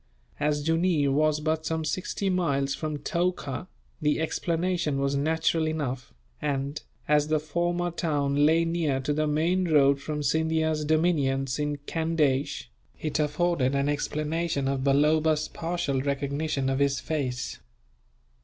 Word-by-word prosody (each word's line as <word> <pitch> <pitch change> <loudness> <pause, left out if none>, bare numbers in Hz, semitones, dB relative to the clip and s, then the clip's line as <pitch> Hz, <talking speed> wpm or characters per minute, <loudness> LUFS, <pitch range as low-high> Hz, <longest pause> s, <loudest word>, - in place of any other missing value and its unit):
As 145 0 0
Jooneer 165 -3 +2
was 155 +2 +2
but 160 +1 0
some 160 0 -2
sixty 185 +4 -2
miles 140 -7 +1
from 155 0 -3
Toka, 170 -1 -2 0.3
the 150 0 +2
explanation 165 -1 -1
was 140 0 0
natural 160 +2 +1
enough 135 -6 -3 0.3
and, 140 0 -2 0.3
as 150 0 +3
the 155 0 +2
former 175 +3 -1
town 145 -4 0
lay 165 +2 +4
near 165 -5 0
to 135 +3 -1
the 155 +1 0
main 170 +5 +1
road 140 -3 +4
from 150 0 -3
Scindia's 160 0 +1
dominions 145 -4 +1
in 145 0 -1
Candeish, 150 -4 0 0.3
it 155 0 -2
afforded 150 -3 +1
an 140 +1 +1
explanation 150 0 -1
of 135 -1 -1
Balloba's 150 +2 +3
partial 165 -5 -2
recognition 140 +1 -1
of 135 0 0
his 140 -1 +2
face. 130 -6 -3
150 Hz, 135 wpm, -27 LUFS, 140-160 Hz, 0.3 s, lay